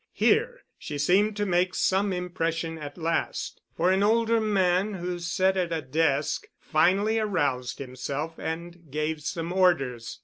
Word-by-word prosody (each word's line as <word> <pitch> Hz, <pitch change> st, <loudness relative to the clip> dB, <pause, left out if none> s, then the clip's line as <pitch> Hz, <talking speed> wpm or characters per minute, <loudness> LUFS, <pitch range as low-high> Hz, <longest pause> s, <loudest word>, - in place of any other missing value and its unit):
Here -, -, +2 dB, 0.2 s
she 150 Hz, -, -5 dB
seemed 200 Hz, +8 st, +2 dB
to 205 Hz, -, 0 dB
make 180 Hz, 0 st, +1 dB
some 195 Hz, +1 st, +2 dB
impression 165 Hz, -2 st, -2 dB
at 145 Hz, -1 st, -8 dB
last, 165 Hz, 0 st, -2 dB, 0.2 s
for 180 Hz, +2 st, +3 dB
an 190 Hz, +1 st, +2 dB
older 225 Hz, +2 st, +3 dB
man, 195 Hz, -1 st, +2 dB
who 175 Hz, -1 st, -4 dB
sat 185 Hz, +3 st, +1 dB
at 175 Hz, -2 st, 0 dB
a 160 Hz, -2 st, -2 dB
desk, 145 Hz, +1 st, 0 dB
finally 200 Hz, +8 st, +2 dB
aroused 145 Hz, -, -1 dB
himself 140 Hz, +4 st, -5 dB
and 170 Hz, 0 st, -6 dB
gave 155 Hz, +2 st, -2 dB
some 165 Hz, +3 st, -3 dB
orders. 135 Hz, -11 st, +1 dB
175 Hz, 145 wpm, -27 LUFS, 155-190 Hz, 0.2 s, for